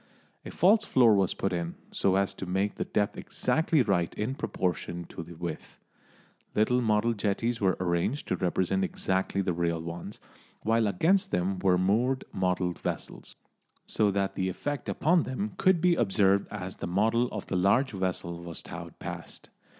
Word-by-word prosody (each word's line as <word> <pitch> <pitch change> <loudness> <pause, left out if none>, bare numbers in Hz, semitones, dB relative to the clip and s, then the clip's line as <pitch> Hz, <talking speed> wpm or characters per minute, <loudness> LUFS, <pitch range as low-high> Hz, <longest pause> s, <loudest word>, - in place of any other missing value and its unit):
A - - -7
false 210 +6 +4
floor 125 - +5
was 95 -3 +2
put 95 - -1
in, 85 -1 -3 0.2
so 95 -1 +1
as 100 0 +1
to 95 - -7
make 95 +3 0
the - - -3
depth 105 -1 -1
exactly 160 -3 +1
right 90 -6 +1
in 110 +5 -2
proportion 90 - -2
to - - -7
the 85 +1 -10
width. 85 -1 -6 0.8
Little 125 +4 +3
model 110 0 +2
jetties 115 +3 -1
were 95 -2 +2
arranged 90 +10 -1
to - - +2
represent 95 +1 0
exactly 95 +1 -1
the 90 -2 0
real 85 -1 0
ones, 85 +5 -7 0.4
while 115 0 +2
against 185 - +2
them 95 - 0
were 90 -1 +3
moored 115 +8 +1
model 90 -1 0
vessels, 85 - -5 0.5
so 105 -2 +2
that 100 0 0
the 95 0 -1
effect 145 +9 -4
upon 170 +3 +3
them 175 +12 -3
could 185 -3 +3
be 180 0 +4
observed 100 - +3
as 95 -3 -6
the - - -4
model 110 +7 +2
of 105 -4 -6
the - - -3
large 100 +9 +3
vessel 90 -3 -3
was 85 -2 -6
towed - - -8
past. - - -7
100 Hz, 170 wpm, -28 LUFS, 90-120 Hz, 0.8 s, floor